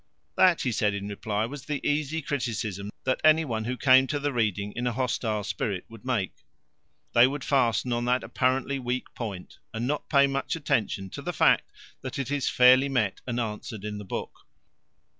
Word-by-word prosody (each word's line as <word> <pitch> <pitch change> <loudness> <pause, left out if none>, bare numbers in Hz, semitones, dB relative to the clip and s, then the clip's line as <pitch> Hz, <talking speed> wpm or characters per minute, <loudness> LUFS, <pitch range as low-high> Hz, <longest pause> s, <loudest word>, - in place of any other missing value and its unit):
That, 180 -3 +5
he 125 - 0
said 105 -2 +1
in 100 0 -5
reply, 105 +1 -2
was 135 +3 -8
the 150 -2 -2
easy 155 +2 -1
criticism 110 -8 -3
that 130 - 0
any 155 +1 +5
one 110 -5 -3
who 125 +2 -3
came 130 0 +5
to 145 - -1
the 145 0 -1
reading 105 -3 -1
in 120 +1 -1
a 120 - 0
hostile 115 -4 -1
spirit 100 -2 -3
would 115 -2 -13
make. 120 -8 -1 0.8
They 120 +1 +7
would 140 +1 -4
fasten 125 -3 +1
on 120 0 -1
that 125 +1 +1
apparently 130 +1 0
weak 125 0 -3
point 100 -7 -7
and 115 +1 -3
not 145 +3 -2
pay 140 -2 +5
much 140 +2 -2
attention 105 - -1
to - - -7
the - - -4
fact - - +3 0.3
that - - -6
it 135 -1 -3
is 145 -3 0
fairly 130 +2 +6
met 110 -8 0
and 120 -1 -1
answered 105 -2 -5
in 105 -1 -4
the - - -7
book. 95 - -7
125 Hz, 195 wpm, -27 LUFS, 105-135 Hz, 0.8 s, They